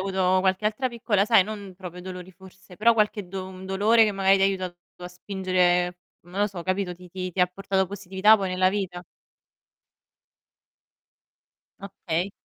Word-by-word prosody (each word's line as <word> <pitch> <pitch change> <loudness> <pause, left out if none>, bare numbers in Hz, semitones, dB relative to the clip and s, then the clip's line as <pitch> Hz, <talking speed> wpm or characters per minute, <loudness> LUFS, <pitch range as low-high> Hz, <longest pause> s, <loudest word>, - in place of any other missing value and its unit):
avuto 185 -1 +1
qualche 190 +2 0
altra 220 +5 0
piccola 220 -4 0
sai 215 -5 +5
non 200 -3 -8
proprio 180 -2 -9
dolori 180 0 -8
forse, 185 0 -16
però 230 +2 +4
qualche 210 -3 0
do 190 0 -5
un 190 0 -10
dolore 215 +4 +4
che 210 - +1
magari 195 0 +3
ti 195 - 0
ha - - +6
aiutato 185 -2 -3 0.3
a - - -4
spingere, 180 -1 0 0.2
non 180 +4 -6
lo 205 - +3
so, 185 -4 -7
capito, 185 -1 -2
ti 180 0 -15
ti 185 0 -5
ti 180 - -3
ha 180 - +5
portato 190 +1 -1
positività 200 +2 +3
poi 190 -1 -2
nella 185 0 +2
vita? 180 -3 -4 2.7
Okay. 190 -2 -3
190 Hz, 170 wpm, -25 LUFS, 180-200 Hz, 2.7 s, ha